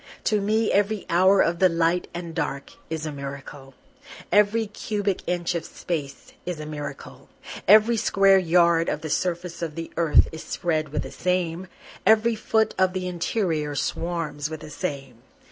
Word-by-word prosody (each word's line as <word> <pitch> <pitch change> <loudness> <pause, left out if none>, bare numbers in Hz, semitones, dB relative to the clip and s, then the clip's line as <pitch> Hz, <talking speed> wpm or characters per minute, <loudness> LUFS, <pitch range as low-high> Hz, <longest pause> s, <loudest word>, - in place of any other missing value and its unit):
To 210 -2 +1
me 215 +2 +1
every 205 0 +1
hour 185 +3 +5
of 170 0 +1
the 185 - +5
light 165 +1 +1
and 170 -1 -6
dark 140 -2 -3 0.2
is 160 -1 -3
a 155 - -3
miracle, 140 -1 -8 0.6
Every 210 +2 +3
cubic 205 -2 -3
inch 175 0 -1
of 170 -1 -2
space 145 -7 -6
is 175 -3 -5
a 150 - -6
miracle, 150 -1 -8 0.4
Every 220 +3 +6
square 195 -2 +4
yard 170 -1 +3
of 150 - -2
the 155 - -5
surface 175 0 -2
of 160 -3 -4
the 165 0 -6
earth 165 -2 +4
is 160 - -8
spread 155 -3 -2
with 150 - -2
the - - -8
same, 180 0 -1 0.4
Every 220 +1 +4
foot 220 0 +1
of 190 -1 +3
the 185 -1 -3
interior 170 -4 -1
swarms 155 -2 -3
with 155 -1 -7
the 150 - -10
same. 135 -5 -5
170 Hz, 165 wpm, -24 LUFS, 155-195 Hz, 0.6 s, Every